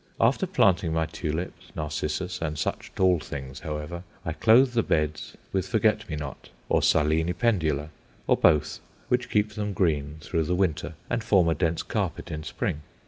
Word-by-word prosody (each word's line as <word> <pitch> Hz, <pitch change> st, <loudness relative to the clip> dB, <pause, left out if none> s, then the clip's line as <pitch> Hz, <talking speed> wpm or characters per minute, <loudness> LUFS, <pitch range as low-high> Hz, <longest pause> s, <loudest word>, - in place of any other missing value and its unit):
After 130 Hz, +11 st, +3 dB
planting 95 Hz, -, +3 dB
my 80 Hz, 0 st, +1 dB
tulips, 85 Hz, +2 st, -4 dB
narcissus, 75 Hz, +4 st, -3 dB
and 75 Hz, -2 st, -2 dB
such -, -, -3 dB
tall 90 Hz, -2 st, +4 dB
things, 65 Hz, -2 st, -7 dB
however, 75 Hz, +1 st, -5 dB, 0.2 s
I 80 Hz, -, -1 dB
clothe 120 Hz, +9 st, +5 dB
the 115 Hz, -, +3 dB
beds 75 Hz, -5 st, -1 dB, 0.2 s
with 95 Hz, -1 st, 0 dB
forget 110 Hz, -1 st, +1 dB
me 80 Hz, -, -2 dB
not 75 Hz, -3 st, -7 dB, 0.2 s
or -, -, +3 dB
Silene 80 Hz, +3 st, +2 dB
pendula, 80 Hz, -, +1 dB, 0.4 s
or -, -, +4 dB
both, 75 Hz, -2 st, +3 dB, 0.3 s
which 125 Hz, 0 st, +1 dB
keep 105 Hz, -1 st, +2 dB
them 105 Hz, -1 st, -3 dB
green 75 Hz, -5 st, 0 dB
through 80 Hz, 0 st, -1 dB
the 90 Hz, -, 0 dB
winter 80 Hz, -4 st, 0 dB
and 115 Hz, -, -1 dB
form 95 Hz, -6 st, +4 dB
a -, -, +3 dB
dense 80 Hz, +1 st, 0 dB
carpet -, -, -3 dB
in 75 Hz, 0 st, -4 dB
spring. 75 Hz, -1 st, -3 dB
85 Hz, 170 wpm, -26 LUFS, 75-100 Hz, 0.4 s, clothe